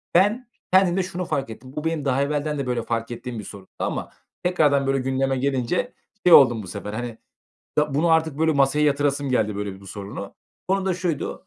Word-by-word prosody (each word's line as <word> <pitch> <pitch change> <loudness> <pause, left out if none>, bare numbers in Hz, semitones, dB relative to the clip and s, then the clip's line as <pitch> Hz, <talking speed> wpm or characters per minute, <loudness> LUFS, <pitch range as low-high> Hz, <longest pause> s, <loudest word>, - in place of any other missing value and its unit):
Ben 210 +8 +3 0.3
kendimde 190 0 +4
şunu 180 0 -4
fark 135 -5 -2
ettim. 130 +4 -10
Bu 150 - -3
benim 160 -3 -1
daha 135 0 +2
evvelden 150 +1 -1
de, 140 - -2
böyle, 125 -1 0
fark 115 0 -3
ettiğim 120 0 -6
bir - - -6
sorundu 100 -2 -11
ama - - -3 0.3
tekrardan, 150 -6 +3
böyle, 135 0 +2
gündeme 135 +1 0
gelince 135 - -1 0.3
şey 180 - +7
oldum. 120 -5 +7
Bu - - -9
sefer, 105 +3 -6
hani, 120 0 -5 0.6
ya 150 -2 +2
bunu 155 +4 +2
artık, 160 -3 +2
böyle, 160 0 +3
masaya 140 +1 +3
yatırasım 145 -1 +1
geldi, 110 -5 +1
böyle, 100 -2 -5
bu 100 - -14
sorunu. 100 0 -7 0.3
Konu 195 0 +1
da 190 - +1
şuydu: 170 0 -3
140 Hz, 200 wpm, -23 LUFS, 120-160 Hz, 0.6 s, şey